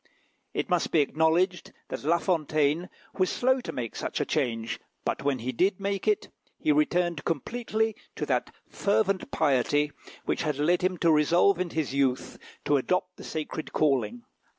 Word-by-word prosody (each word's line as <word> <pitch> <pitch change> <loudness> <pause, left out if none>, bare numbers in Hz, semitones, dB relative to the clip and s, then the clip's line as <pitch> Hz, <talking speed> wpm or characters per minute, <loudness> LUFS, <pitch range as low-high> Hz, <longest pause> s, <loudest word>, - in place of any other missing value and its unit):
It - - -1
must 180 -3 +1
be 160 - +4
acknowledged 160 +5 +1 0.2
that - - -5
La 165 +4 +3
Fontaine 155 -1 +1 0.3
was 185 - +3
slow 260 +1 +2
to - - -5
make 120 -3 -5
such - - -3
a - - +1
change; 115 -7 -1 0.3
but - - -1
when 140 -1 +1
he 125 +2 -3
did 185 - +1
make 200 0 -2
it, 425 0 +1 0.3
he 310 - +1
returned 180 - +1
completely 220 - -1 0.2
to - - -2
that - - 0 0.2
fervent 200 -1 0
piety 145 0 +2 0.3
which - - 0
had 150 -4 -1
led 170 +5 +2
him 185 0 0
to 165 0 +3
resolve 170 +5 +4
in 180 -1 -1
his 155 -5 -2
youth 135 -2 0 0.3
to 145 - +4
adopt 180 +6 -1
the - - -10
sacred 155 0 -5
calling. 155 - +1
165 Hz, 170 wpm, -27 LUFS, 145-190 Hz, 0.3 s, be